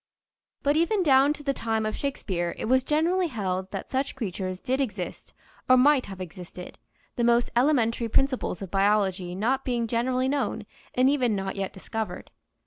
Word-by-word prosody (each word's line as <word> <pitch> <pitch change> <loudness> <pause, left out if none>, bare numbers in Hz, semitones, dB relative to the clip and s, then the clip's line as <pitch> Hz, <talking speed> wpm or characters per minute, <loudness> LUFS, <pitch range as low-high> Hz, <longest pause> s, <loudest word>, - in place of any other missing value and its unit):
But 285 +1 +3
even 365 +5 +2
down 275 -2 +5
to 295 - -11
the 275 -1 0
time 225 -3 -1
of 215 - -2
Shakespeare 185 -11 -2
it - - -4
was 260 +3 +3
generally 335 +6 +1
held 190 - -3
that 195 -1 -6
such 270 +1 -1
creatures 185 -6 -4
did 260 +4 -1
exist 205 -8 -4 0.4
or 255 - +7
might 275 +1 +4
have 190 -1 -8
existed, 180 0 -9 0.4
the 240 - +1
most 235 0 +3
elementary 240 -3 +2
principles 260 -7 0
of 185 - -8
biology 195 -3 +1
not 255 +7 0
being 240 -2 -1
generally 250 +3 0
known 280 +1 -1 0.3
and 255 +1 +4
even 255 -6 +2
not 195 -1 -3
yet 195 -1 -3
discovered. 215 0 -5
235 Hz, 170 wpm, -26 LUFS, 195-270 Hz, 0.4 s, or